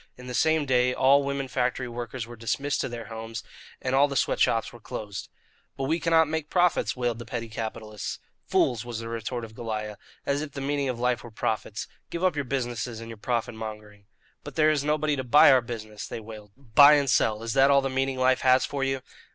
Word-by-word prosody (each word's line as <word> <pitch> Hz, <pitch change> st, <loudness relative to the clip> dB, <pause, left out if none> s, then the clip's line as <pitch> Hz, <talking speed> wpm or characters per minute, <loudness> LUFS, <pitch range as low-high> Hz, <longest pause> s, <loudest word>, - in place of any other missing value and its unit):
In 125 Hz, -, -11 dB
the 125 Hz, -, -6 dB
same 160 Hz, +3 st, +2 dB
day 125 Hz, -1 st, +2 dB
all 140 Hz, +2 st, +5 dB
women 140 Hz, -1 st, -2 dB
factory 125 Hz, 0 st, -1 dB
workers 120 Hz, 0 st, -5 dB
were 120 Hz, +1 st, -10 dB
dismissed 125 Hz, +5 st, -1 dB
to -, -, -2 dB
their 120 Hz, -1 st, -6 dB
homes, 115 Hz, +1 st, -7 dB, 0.4 s
and 130 Hz, -, -2 dB
all 140 Hz, +2 st, +5 dB
the 140 Hz, -, -5 dB
sweat -, -, +1 dB
shops 115 Hz, 0 st, +2 dB
were 120 Hz, -, -12 dB
closed. 105 Hz, -2 st, -6 dB, 0.5 s
"But 135 Hz, -, -3 dB
we 160 Hz, +5 st, +1 dB
cannot 165 Hz, -1 st, +4 dB
make 160 Hz, 0 st, -3 dB
profits!" 180 Hz, -1 st, +2 dB
wailed 120 Hz, -2 st, -1 dB
the -, -, -6 dB
petty 115 Hz, +1 st, -5 dB
capitalists. 110 Hz, -2 st, -5 dB, 0.3 s
"Fools!" 115 Hz, -3 st, +2 dB
was 120 Hz, -2 st, -5 dB
the 115 Hz, 0 st, -6 dB
retort 115 Hz, +1 st, -4 dB
of 110 Hz, -, -13 dB
Goliah. 110 Hz, -2 st, -4 dB, 0.3 s
"As 140 Hz, +1 st, 0 dB
if 155 Hz, -2 st, -6 dB
the 140 Hz, -, -5 dB
meaning 140 Hz, 0 st, -1 dB
of 120 Hz, -2 st, -3 dB
life 125 Hz, -2 st, 0 dB
were 120 Hz, -, -9 dB
profits! 110 Hz, -1 st, -3 dB, 0.2 s
Give 170 Hz, +1 st, -4 dB
up 185 Hz, -4 st, +3 dB
your 145 Hz, -2 st, -2 dB
businesses 120 Hz, -3 st, -3 dB
and 115 Hz, 0 st, -8 dB
your 115 Hz, -, -8 dB
profit 120 Hz, +2 st, -2 dB
mongering." 105 Hz, -2 st, -8 dB, 0.4 s
"But -, -, -9 dB
there 155 Hz, -1 st, +4 dB
is 145 Hz, -2 st, 0 dB
nobody 150 Hz, 0 st, +1 dB
to 130 Hz, -, -2 dB
buy 145 Hz, +3 st, +7 dB
our 130 Hz, -1 st, +5 dB
business!" 110 Hz, -3 st, -7 dB
they -, -, -5 dB
wailed. 105 Hz, -2 st, -11 dB
"Buy 140 Hz, +3 st, +7 dB
and 140 Hz, -1 st, +1 dB
sell 110 Hz, -3 st, +2 dB
is 115 Hz, -1 st, -2 dB
that 135 Hz, 0 st, +5 dB
all 140 Hz, 0 st, +5 dB
the 135 Hz, -, -1 dB
meaning 135 Hz, 0 st, -1 dB
life 130 Hz, 0 st, +3 dB
has 130 Hz, 0 st, +4 dB
for 140 Hz, -1 st, -3 dB
you?" 135 Hz, -1 st, -1 dB
125 Hz, 225 wpm, -26 LUFS, 115-140 Hz, 0.5 s, buy